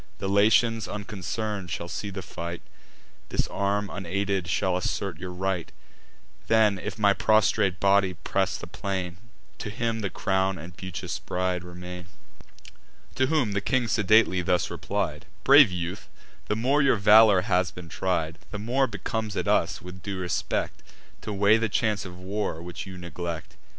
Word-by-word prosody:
The 95 - -4
Latians 110 +2 +3
unconcern'd 105 -1 -4
shall 85 +1 -4
see 100 +3 -4
the 95 -1 -6
fight; 85 +1 -6 0.7
This - - 0
arm 100 +1 0
unaided 100 0 -2
shall 95 0 +1
assert 90 -1 -2
your 90 - -5
right: 90 -1 -2 0.8
Then, 110 -3 +4
if - - -5
my 100 -2 +4
prostrate 105 -3 +2
body 100 -1 +3
press - - -1
the - - -8
plain, 95 -3 -4 0.4
To 105 - -4
him 115 +1 -2
the 100 -3 -2
crown 95 0 0
and 85 +3 -10
beauteous 95 -3 -5
bride 90 -1 -2
remain." 90 0 -8 1.1
To 130 - +2
whom 150 -9 +1
the 100 0 -1
king 130 +2 +1
sedately 110 -3 +4
thus 90 0 +1
replied: - - -3 0.2
"Brave 140 -3 +8
youth, 90 +2 -5 0.4
the 105 - 0
more 135 +7 +2
your 135 -3 +4
valour 105 -1 +7
has 90 -1 +1
been 90 +1 -10
tried, 80 -2 -2
The 105 - -5
more 125 +6 +1
becomes 110 0 -4
it - - -2
us, - - +1
with 90 0 -9
due 100 +2 -4
respect, 90 -2 -2 0.4
To - - -5
weigh 100 +2 +4
the 115 -1 0
chance 105 -2 0
of 90 -1 -9
war, 95 -2 -3
which 90 +3 -7
you 95 -1 -8
neglect. 85 -1 -6
95 Hz, 160 wpm, -26 LUFS, 90-105 Hz, 1.1 s, Brave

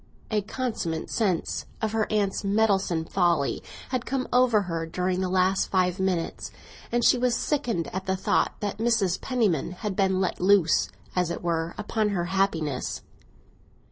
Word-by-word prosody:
A 215 -1 +2
consummate 205 -8 -3
sense 190 -7 -1
of 220 -1 -1
her 220 -1 0
aunt's 205 -2 0
meddlesome 195 -5 +1
folly 170 -6 +1 0.3
had 255 -2 -1
come 260 -1 -1
over 245 -4 +4
her 165 -3 -3
during 180 +2 -1
the 185 - -1
last 185 +1 +2
five 185 0 +1
minutes, 185 -3 -1 0.4
and 240 0 +1
she 250 - +5
was 245 -1 +2
sickened 235 - -1
at 190 +1 -4
the 190 - +1
thought 190 - +1
that 205 0 -3
Mrs. 220 -6 +1
Penniman 205 - 0
had 190 +2 -4
been 190 -1 +2
let 190 -2 -1
loose, 185 -3 +4 0.3
as 180 -2 +1
it 170 - -4
were, 165 -1 -1
upon 215 0 0
her 180 -4 -1
happiness. 160 -9 -1
190 Hz, 160 wpm, -26 LUFS, 175-220 Hz, 0.4 s, she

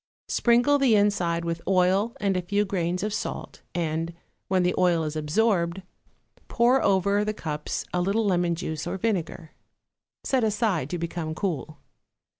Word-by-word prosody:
Sprinkle 245 +4 +3
the 260 -5 +4
inside 180 -5 +1
with 165 0 -3
oil 195 +6 +2
and 200 -2 +1
a 180 - 0
few 200 +4 0
grains 180 -1 -1
of 210 0 -2
salt, - - -5
and, 165 0 -2 0.3
when 185 -1 +2
the 180 - +2
oil 175 -3 +2
is 155 0 -4
absorbed, 170 +3 +1 0.6
pour 245 +3 +3
over 200 +1 +2
the 215 0 -2
cups 150 -5 -4
a 180 - +1
little 200 +5 +1
lemon 175 -3 +1
juice 160 -1 -4
or 180 +2 -3
vinegar. 180 -6 -2 0.7
Set 260 -3 +1
aside 210 - 0
to 175 - -2
become 165 -1 -4
cool. 155 -4 -3
180 Hz, 155 wpm, -26 LUFS, 170-210 Hz, 0.7 s, the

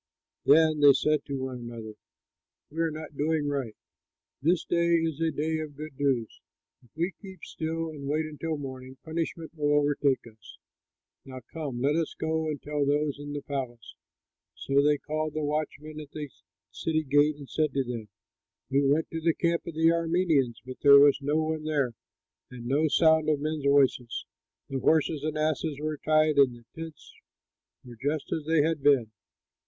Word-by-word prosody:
Then 155 +1 +5
they 145 -1 +8
said 150 +1 +1
to 140 - -4
one 130 -1 -4
another, 115 -2 -8 0.8
"We 160 - -7
are 165 - +2
not 155 -1 -8
doing 150 +1 0
right; 135 -6 -2 0.7
this 165 +4 +2
day 170 0 +2
is 165 -2 -1
a 165 - +2
day 160 +1 -1
of 155 -2 -6
good 150 -2 -8
news. 130 -6 0 0.4
If 120 - -23
we 170 +4 -1
keep 190 -4 -11
still 160 0 -4
and 140 -3 -8
wait 155 +2 0
until 155 +1 -4
morning 130 -2 -8
punishment 165 0 -4
will 145 -2 +1
overtake 145 -3 +1
us. 110 -3 -15 0.7
Now, 130 -1 -9
come, 145 -7 -4
let 145 +3 +2
us 165 -1 -1
go 160 0 -1
and 150 -2 -3
tell 150 -1 -2
those 145 0 0
in 145 0 -6
the 145 - -5
palace." 125 -5 -5 0.6
So 140 +1 +1
they 145 +1 +3
called 155 +1 -3
the 155 - -1
watchmen 155 +1 -3
at 150 -2 -9
the 150 -1 -6 0.4
city 155 -1 -1
gate 145 +2 +3
and 145 -2 -11
said 155 +1 0
to 135 - +2
them, 120 -4 -6 0.6
"We 140 +1 +3
went 145 +3 +2
to 165 - -4
the 165 0 +2
camp 170 -1 0
of 165 - -6
the 165 +1 +4
Arameans, 165 -7 +1
but 130 0 -8
there 140 -1 +9
was 140 0 +6
no 145 +2 0
one 155 0 -2
there 145 -5 0 0.6
and 120 -2 -10
no 145 +5 +2
sound 160 0 +4
of 150 -2 +2
men's 155 -1 -3
voices. 135 -4 +2 0.4
The 135 - -3
horses 155 0 +2
and 155 0 -2
asses 155 -1 -1
were 155 0 -3
tied 155 -1 +3
and 130 -3 +5
the 120 -1 -17
tents 160 -1 -9 0.7
were 120 -2 -11
just 145 +1 -2
as 155 - -2
they 160 -2 +4
had 160 -1 0
been." 135 -6 +3
150 Hz, 180 wpm, -28 LUFS, 140-160 Hz, 0.8 s, there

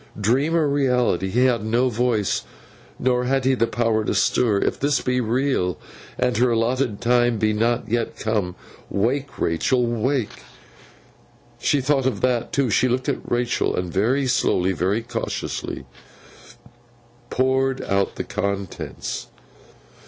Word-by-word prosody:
Dream 130 +10 +2
or 160 -3 +3
reality, 125 -9 +1
he 125 +6 +3
had 120 -4 +2
no 120 +4 +2
voice, 120 -4 0 0.5
nor 125 -1 +1
had 135 0 +1
he 130 0 +3
power 115 -2 +1
to - - -1
stir. 115 -5 +2
If - - -1
this 145 -1 +2
be 125 0 0
real, 120 - 0 0.4
and 125 -1 +1
her 125 +2 +3
allotted 115 -1 0
time 120 -1 +3
be 110 0 +1
not 115 +3 0
yet 115 +1 -1
come, 105 -5 -1 0.3
wake, 130 +7 -1
Rachael, 120 +10 +1
wake! 120 - -1 1.2
She 145 - +2
thought 135 0 +1
of 130 - -2
that, 125 -2 0
too. 135 -5 +1
She 130 - +3
looked 130 +3 -1
at 140 - -3
Rachael, 120 0 0
and 90 -2 -3
very 125 +8 +2
slowly, 110 -8 +2
very 95 +6 0
cautiously, 115 -1 -4 1.4
poured 130 +1 +1
out 100 0 0
the - - -3
contents. 100 -2 -4
120 Hz, 135 wpm, -22 LUFS, 110-130 Hz, 1.4 s, or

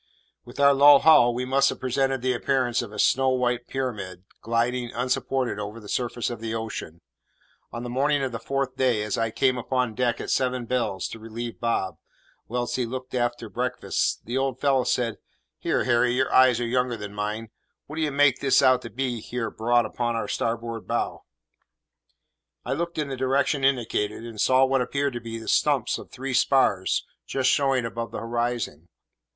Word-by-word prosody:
With 120 - -12
our 140 0 +6
low 145 +1 +8
hull, 135 -6 +6
we 125 +2 -3
must 135 +1 +3
have - - -5
presented 135 0 0
the 130 0 +2
appearance 125 -1 0
of 115 -4 -7
a 105 - -9
snow 135 0 +3
white 125 -1 0
pyramid, 100 -9 -4 0.2
gliding, 120 +1 -1
unsupported, 125 -1 -1
over 105 +2 -6
the 105 - -12
surface 120 +1 -2
of 120 - -6
the 115 0 -3
ocean. 110 -7 -6 0.7
On 120 - -6
the 120 - -5
morning 140 +2 +1
of 130 - -2
the 115 - -5
fourth 135 -1 -2
day, 125 -5 +1
as 105 - -2
I 115 0 0
came 125 +2 +1
upon 125 -1 -1
deck 120 +1 0
at - - -4
seven 125 -1 0
bells 115 -6 -1
to 115 - -8
relieve 115 +1 -6
Bob, 95 -8 -1 0.5
whilst 120 +1 -2
he 125 - 0
looked 130 +1 -6
after 120 -2 -1
breakfast, 125 +4 -2
the 125 +4 -1
old 135 -1 -1
fellow 135 -3 +2
said, 115 -3 0 0.4
"Here, - - 0
Harry, 120 0 +2
your 130 +1 0
eyes 130 -2 +6
are 120 - -1
younger 125 0 0
than 105 -1 -7
mine; 105 +2 -4 0.3
what 155 - -9
d'ye 155 -2 +1
make 140 -2 +3
this 140 0 +3
out 130 -1 +5
to 115 - -8
be 130 0 -2
away 120 - -5
here 120 0 -4
broad 120 +1 +2
upon 120 +2 -2
our 115 - -2
starboard 115 -1 -3
bow?" - - -2 1.4
I - - -1
looked 170 +4 -3
in 150 -2 -1
the 135 - -3
direction 135 +2 +1
indicated, 115 -5 0
and 115 -3 -5
saw 130 +1 +5
what 135 0 +1
appeared 140 +2 -1
to 120 - -5
be 115 0 -6
the 110 - -9
stumps - - +2
of - - -11
three 135 +1 -5
spars 120 -7 +2 0.2
just 130 -1 +1
showing 135 -4 +2
above 115 0 -4
the - - -6
horizon. 120 -8 -3
125 Hz, 190 wpm, -25 LUFS, 115-130 Hz, 1.4 s, low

